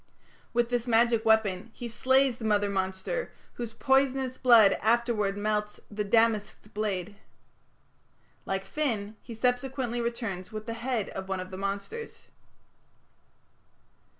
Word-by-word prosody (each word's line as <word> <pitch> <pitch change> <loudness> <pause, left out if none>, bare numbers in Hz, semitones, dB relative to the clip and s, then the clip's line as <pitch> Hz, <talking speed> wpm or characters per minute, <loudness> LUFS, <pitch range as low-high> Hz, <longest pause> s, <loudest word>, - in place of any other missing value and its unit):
With 240 0 +1
this 245 0 -1
magic 230 -1 +3
weapon 220 -2 +2
he 240 - -6
slays 260 +2 +2
the - - -8
mother 205 -2 +2
monster, 190 - -2 0.2
whose 235 -2 -5
poisonous 265 +1 +2
blood 230 -6 +7
afterwards 220 -3 +1
melts 210 0 -1
the 210 0 -2
"damasked 215 0 +1
blade". 205 -2 -3 1.3
Like 195 0 -2
Finn, 220 -5 -2
he 235 - -9
subsequently 245 0 -1
returns 230 -6 -4
with 215 0 -6
the 230 - -4
head 230 -2 -2
of 190 0 -7
one 190 -1 -1
of 185 +1 -7
the - - -6
monsters. 200 - -5
225 Hz, 125 wpm, -28 LUFS, 200-240 Hz, 1.3 s, blood